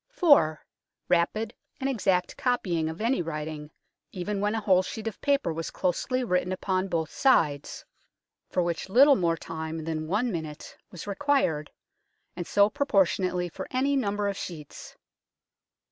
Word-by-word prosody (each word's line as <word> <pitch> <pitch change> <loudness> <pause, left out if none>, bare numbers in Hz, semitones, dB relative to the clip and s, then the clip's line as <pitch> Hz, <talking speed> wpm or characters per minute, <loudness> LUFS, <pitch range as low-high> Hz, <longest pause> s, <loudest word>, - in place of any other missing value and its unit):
4. 285 - +4 0.4
Rapid 215 +6 +1 0.3
and 270 - -1
exact 195 -8 +1
copying 180 -11 0
of 160 +5 -7
any 235 -1 +1
writing, 155 -2 -5 0.4
even 200 +2 -3
when 210 +2 +1
a - - 0
whole 190 -3 +4
sheet 215 +4 -6
of 225 - -6
paper 280 - +1
was 165 +1 -4
closely 255 +8 -1
o - - -2
210 180 -2 0
UNKNOWN 190 0 -2
LONDON 185 +1 0
written - - -2
upon - - +3
both 160 - -8
sides, 150 - +1 0.6
for 180 - +1
which 170 +2 -3
little 275 +7 +7
more 170 -6 +1
time 160 0 -5
than 155 -1 -3
one 220 +8 0
minute 160 -4 -6
was 180 - -9
required, 200 - 0 0.7
and 175 -1 -5
so 200 0 +5
pro 280 +7 -2
portionately 180 -3 +1
for 190 - -7
any 275 +2 +1
number 205 -5 0
of 200 - -1
sheets. 155 -7 -8
185 Hz, 165 wpm, -27 LUFS, 165-225 Hz, 0.7 s, little